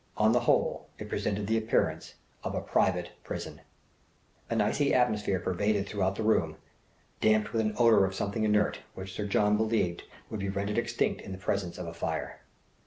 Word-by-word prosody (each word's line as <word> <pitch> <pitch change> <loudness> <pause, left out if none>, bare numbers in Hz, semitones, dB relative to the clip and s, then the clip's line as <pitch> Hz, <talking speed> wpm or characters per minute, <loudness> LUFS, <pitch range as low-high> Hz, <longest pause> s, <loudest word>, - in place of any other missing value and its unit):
On 110 +1 +4
the 120 - +4
whole, 120 - +1
it - - -7
presented 100 0 -1
the 110 +2 +2
appearance 110 +1 0 0.3
of - - -3
a - - 0
private - - +1
prison. - - -6 0.9
An - - 0
icy 145 -1 +2
atmosphere 105 -6 +2
pervaded 100 +3 0
throughout 95 -2 0
the 110 - -3
room, 110 +1 +2 0.6
damped 110 -1 +2
with 115 - +2
an 110 -1 -1
odour 115 -4 +6
of 95 0 -1
something 105 +3 -2
inert, 105 -1 +2 0.2
which 95 0 -7
Sir 105 +2 -3
John 105 +1 +3
believed 110 -6 0 0.3
would 110 - -3
be 100 0 -2
rendered 100 +3 -1
extinct 120 0 -1
in 95 - -7
the - - -6
presence 95 -1 -2
of 90 - -5
a 85 - -6
fire. 85 - -4
105 Hz, 180 wpm, -29 LUFS, 95-110 Hz, 0.9 s, odour